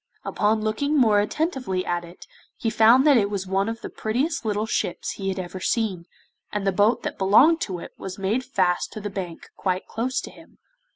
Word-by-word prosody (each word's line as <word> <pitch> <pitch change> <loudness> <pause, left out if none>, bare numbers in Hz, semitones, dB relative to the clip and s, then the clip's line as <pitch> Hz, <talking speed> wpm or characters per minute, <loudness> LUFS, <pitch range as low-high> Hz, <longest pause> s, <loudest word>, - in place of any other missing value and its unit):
Upon 215 +1 +1
looking 280 +8 0
more 220 -6 +5
attentively 230 - -1
at 175 0 -1
it 170 +1 -13 0.3
he 225 - -1
found 235 +5 +6
that 290 -4 +6
it 200 -3 +2
was 200 -2 -3
one 195 +3 0
of 230 0 -5
the - - -6
prettiest 260 +9 -1
little 210 -1 -1
ships 180 - -2
he 195 -1 -4
had 190 - -3
ever 185 0 -5
seen, 190 -4 -1 0.4
and 205 -1 -2
the 195 - +3
boat 205 +5 +2
that - - -5
belonged 270 - +5
to 185 -3 -2
it - - -9
was 190 -1 -6
made 205 +6 0
fast 185 -9 0
to - - -6
the 205 -1 -5
bank 180 -4 -7
quite 185 -1 -2
close 250 +4 -2
to - - -9
him. - - -18
210 Hz, 210 wpm, -24 LUFS, 190-235 Hz, 0.4 s, found